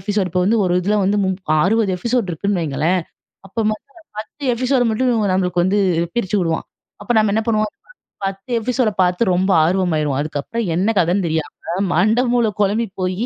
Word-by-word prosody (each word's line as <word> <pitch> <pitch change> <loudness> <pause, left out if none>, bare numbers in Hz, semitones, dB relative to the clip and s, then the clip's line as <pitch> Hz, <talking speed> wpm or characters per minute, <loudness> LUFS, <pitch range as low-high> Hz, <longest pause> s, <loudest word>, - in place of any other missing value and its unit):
Episode, 200 0 -1
இப்ப 180 -1 +1
வந்து 225 +3 +2
ஒரு 180 -1 +1
இதில 205 +3 +1
வந்து 205 +2 +1
முப் 190 -4 -2
60 215 +1 +2
எபிசோடு 235 0 -1
இருக்குன்னு 195 +3 -1
வைங்களேன். 155 +5 0 0.5
அப்போ 225 - -3 0.6
10 250 +7 -8
எபிசோடு 250 +1 +1
மட்டும் 250 +3 +1 0.2
நம்மளுக்கு 180 -2 +1
வந்து 195 +3 +2 0.4
பிரிச்சு 210 -3 0
விடுவான். 165 -2 -1 0.4
அப்போ 205 - -1
நம்ம 215 -2 +2
என்ன 220 - +1
பண்ணுவோம், 215 -2 +1 0.6
10 195 +4 -5
எபிசோட 250 0 0
பாத்து 180 +3 +2
ரொம்ப 190 +2 +1
ஆர்வமாயிருவோம்! 155 -5 0
அதுக்கப்புறம் 155 +10 -3
என்ன 200 +6 +1
கதன்னு 180 +2 +1
தெரியாம 160 -2 -2 0.4
மண்ட 215 +8 +3
மூளை 235 -3 +2
குழம்பி 210 +4 +1 0.2
போயி 185 +5 -1
195 Hz, 165 wpm, -19 LUFS, 180-220 Hz, 0.6 s, மண்ட